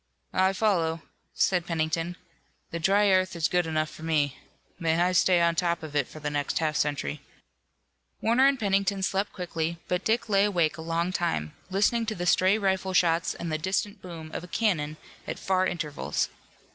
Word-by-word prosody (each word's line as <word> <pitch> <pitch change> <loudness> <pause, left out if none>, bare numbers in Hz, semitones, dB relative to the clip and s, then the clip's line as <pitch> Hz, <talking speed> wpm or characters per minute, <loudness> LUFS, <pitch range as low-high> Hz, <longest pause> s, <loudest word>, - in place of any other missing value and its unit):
"I 190 +1 +3
follow," 170 -6 +1 0.3
said 180 -3 +1
Pennington. 165 +1 -1 0.6
"The 170 - -3
dry 200 +4 +3
earth 185 -1 +2
is 165 -2 +1
good 180 -2 +1
enough 155 -1 -1
for - - -12
me. 150 -4 +1 0.4
May 165 -1 +1
I 180 +1 +3
stay 180 0 +4
on 170 0 +3
top 170 0 0
of 150 -2 -7
it 145 -3 +2
for 155 - -11
the 150 -1 -3
next 145 -1 -1
half 155 -2 0
century." 145 +1 -1 1.0
Warner 240 +4 +4
and 275 -2 +2
Pennington 195 -2 +1
slept 195 +2 0
quickly, 170 -2 -3
but 180 +1 -1
Dick 230 +2 +1
lay 200 -1 +4
awake 175 -7 +1
a - - -7
long 165 +2 -1
time, 80 - -1 0.2
listening 215 +4 +1
to 215 - -2
the 175 - -3
stray 185 +3 +4
rifle 190 -2 0
shots 170 -2 +2
and 170 -1 -5
the 155 - -1
distant 195 +4 -2
boom 165 -3 -9
of - - -4
a - - -9
cannon 160 -8 0 0.3
at - - -4
far 185 -1 +1
intervals. 155 -5 -2
175 Hz, 185 wpm, -27 LUFS, 160-195 Hz, 1.0 s, stay